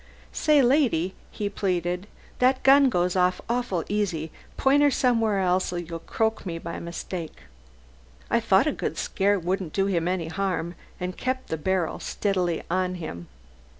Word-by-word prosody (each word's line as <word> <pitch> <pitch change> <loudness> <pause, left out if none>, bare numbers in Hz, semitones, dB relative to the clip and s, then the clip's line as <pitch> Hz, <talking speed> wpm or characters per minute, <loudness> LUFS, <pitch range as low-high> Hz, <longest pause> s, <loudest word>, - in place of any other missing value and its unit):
"Say, 300 -3 +4
lady," 240 - +2 0.2
he 205 - -3
pleaded, 180 -1 -1 0.3
"that 255 +1 +3
gun 275 0 +7
goes 180 -4 0
off 180 0 +2
awful 235 -8 -1
easy, 180 -7 -1 0.3
point 275 +2 +4
her 290 - +6
somewhere 230 -6 +2
else 185 0 +1
or 175 - -3
you'll 170 -1 -5
croak 220 +5 -1
me 170 -3 -4
by 170 0 -6
mistake." 170 -1 -6 0.9
I - - +2
thought - - +4
a - - +2
good - - -4
scare 200 +1 +1
wouldn't 185 -1 -2
do 195 - +2
him 175 -4 0
any 180 -3 -1
harm 180 -2 -2 0.3
and 180 0 -3
kept 260 0 -3
the - - -1
barrel 180 +1 -1
steadily 180 -5 -1
on 185 +1 0
him. 85 - -7
185 Hz, 160 wpm, -25 LUFS, 175-220 Hz, 0.9 s, gun